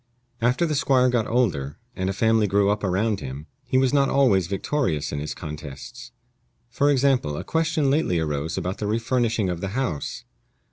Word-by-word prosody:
After 125 +8 +2
the 155 - -1
squire 130 -3 +3
got 120 -3 +1
older, 80 - 0 0.2
and 95 0 -2
a - - +1
family 110 +1 +2
grew 100 +1 +3
up 105 0 -2
around 100 +2 0
him, 70 +1 -7 0.2
he 130 - +1
was 130 0 +3
not 140 -1 +3
always 100 -11 +3
victorious 100 - -1
in 75 - -3
his 75 +1 -4
contests. 75 - -8 0.6
For 140 +4 +2
example, 130 - +2
a - - -4
question 160 -3 +1
lately 140 - +1
arose 80 +1 -2
about 95 +1 -3
the 105 - -2
refurnishing 115 -1 0
of 90 -1 -3
the 100 - -2
house. 90 - -3
110 Hz, 180 wpm, -24 LUFS, 85-130 Hz, 0.6 s, squire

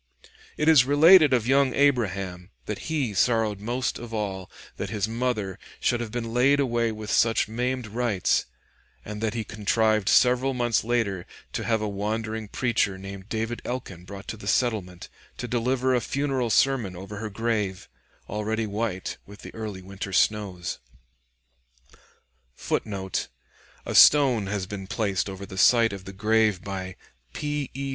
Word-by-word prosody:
It 150 - 0
is 155 -6 +7
related 150 +3 +7
of 120 -4 +2
young 135 0 +3
Abraham, 100 -10 0 0.2
that 105 +8 -5
he 140 -9 -1
sorrowed 110 -1 +1
most 120 +5 -2
of 120 -1 -9
all 95 -3 -3 0.3
that - - -4
his 105 -1 -1
mother 110 -5 -2 0.2
should 120 - +1
have 115 -2 -5
been 115 -1 -4
laid 135 +4 +4
away 120 -4 +1
with 110 -1 -6
such 115 -1 +3
maimed 125 +3 -2
rites, 110 -3 0 0.6
and 105 0 -6
that 110 0 -1
he 115 - -2
contrived 110 0 +1
several 125 +1 +4
months 120 -3 +1
later 110 -6 -1 0.3
to - - -2
have 110 -2 +1
a - - -1
wandering 110 +2 -3
preacher 105 -4 0
named 95 +1 -9
David 115 +1 -3
Elkin 110 -9 -5
brought 100 +1 -10
to 110 - -5
the 100 - -10
settlement, 100 -7 -1 0.3
to 125 - -4
deliver 125 +2 +1
a 125 - +2
funeral 135 -3 -1
sermon 120 -6 +2
over 95 +3 -8
her 110 +1 -4
grave, 105 -3 -2 0.4
already 110 +2 -2
white 105 -2 -3
with 100 +1 -13
the - - -9
early 105 -4 -6
winter 100 +1 -7
snows. 100 -4 0 1.8
[Footnote: 95 - -3 0.6
A - - -4
stone 130 -8 +6
has 100 -1 -2
been 95 0 -7
placed 100 -3 -1
over 95 0 -7
the 95 -2 -7
site 115 -3 +5
of 95 -1 -8
the 95 - -7
grave 105 -1 +1
"by 95 -2 -5 0.4
P. 145 -2 -3
E. 135 0 -3
110 Hz, 155 wpm, -26 LUFS, 100-125 Hz, 1.8 s, is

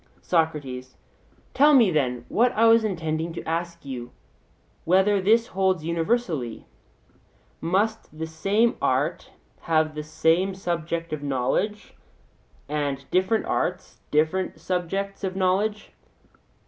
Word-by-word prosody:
SOCRATES: 145 -7 -1 0.6
Tell 290 +2 +6
me, 230 -8 +6
then, 125 -6 0
what 245 +2 +3
I 225 - +3
was 225 0 +6
intending 165 -4 -2
to - - -7
ask 170 0 -3
you, 125 -3 -6 0.7
whether 190 +3 +3
this 225 +4 +4
holds 190 -5 0
universally? 165 - -1 1.0
Must 195 0 -1
the 160 - -3
same 200 +9 +1
art - - 0 0.3
have 155 -1 +1
the 150 - -4
same 165 +5 +1
subject 170 -3 -3
of 155 - -3
knowledge, 145 - -1 0.7
and 145 -2 -2
different 190 +5 +2
arts 180 +1 -2
other 160 +5 +1
subjects 195 +3 -3
of 190 -1 -2
knowledge? 195 +3 0
175 Hz, 115 wpm, -25 LUFS, 155-195 Hz, 1.0 s, Tell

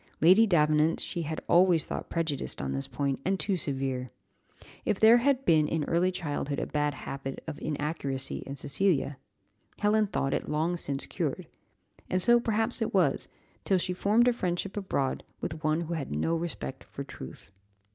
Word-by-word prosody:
Lady 190 +8 +6
Davenant 155 -3 +3
she 170 - -3
had 160 0 -4
always 175 -2 +4
thought - - -5
prejudiced 160 -5 -2
on 65 - -2
this 70 0 -3
point, 140 -2 -2
and 190 +1 0
too 200 - 0
severe. 135 -5 -2 0.7
If 205 - 0
there 225 +2 +8
had 270 +2 +1
been 155 -3 +4
in 160 -1 -1
early 175 +4 +2
childhood 145 -5 -3
a - - -1
bad 145 -1 -1
habit 135 -1 -5
of 160 -2 -7
inaccuracy 145 -3 -2
in 140 - -5
Cecilia, 145 +1 +1 0.6
Helen 210 0 +2
thought 135 -7 -1
it - - -2
long 160 +4 0
since 140 -5 -2
cured; - - -3 0.6
and 185 - +1
so 240 +5 +5
perhaps 225 +1 0
it 220 - -1
was, 165 -8 +2 0.4
till 190 - +2
she 180 0 -1
formed 215 +6 +3
a 245 - +4
friendship 185 -3 -2
abroad 165 -10 -1 0.2
with 160 0 -5
one 155 +2 +1
who 170 0 -4
had 140 - -3
no 165 - +1
respect 165 -5 -5
for 140 - -7
truth. 100 - -10
160 Hz, 175 wpm, -29 LUFS, 140-190 Hz, 0.7 s, there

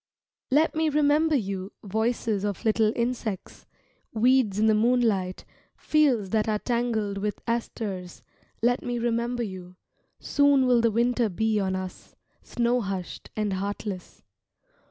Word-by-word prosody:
Let 300 +5 +3
me 315 0 +1
remember 300 +1 +3
you, 195 -4 -3
voices 220 0 -1
of 205 +2 -3
little 220 0 +3
insects, 235 -5 -3 0.5
Weeds 235 -3 +3
in 215 - +3
the 220 - +5
moonlight, 215 -5 +1 0.3
fields 260 -11 +2
that 220 0 +1
are 215 - +1
tangled 225 -4 -1
with 205 +1 -3
asters, 210 -6 -4 0.4
Let 245 +2 +3
me 245 0 -3
remember 235 +1 -1
you, 185 -3 -8 0.4
soon 285 -2 +3
will 245 -2 +4
the 230 - +3
winter 235 +1 +1
be 220 +3 0
on 190 -1 -1
us, 185 -1 -7 0.3
Snow 240 +1 0
hushed 195 -3 -5
and 210 -2 -1
heartless. 200 0 -5
225 Hz, 135 wpm, -26 LUFS, 200-245 Hz, 0.5 s, the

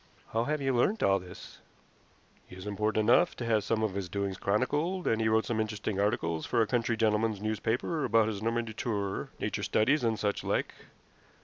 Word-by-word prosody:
"How 115 +1 +1
have 150 0 -1
you 135 -1 +1
learnt 205 - +2
all 95 0 +4
this?" 90 0 -12 0.9
"He - - -12
is 95 +1 -9
important 105 +1 0
enough 150 +9 +4
to 120 - -5
have 110 -3 +2
some 110 +1 0
of 105 -3 0
his 95 -2 -4
doings 100 +1 -2
chronicled, 150 - 0
and 115 0 +1
he 110 - +2
wrote 110 0 +2
some 115 -2 -1
interesting 105 -2 -2
articles 85 -6 0
for 120 - +1
a 115 - +4
country 115 0 0
gentlemen's 110 -1 +1
newspaper 110 +8 -1
about 115 -2 +3
his 105 -2 -3
Normandy 115 0 -1
tour 100 -4 -3
nature - - -2
studies, 130 +6 +2
and 115 -2 +1
such 105 -1 -1
like. - - -1
110 Hz, 195 wpm, -30 LUFS, 105-120 Hz, 0.9 s, all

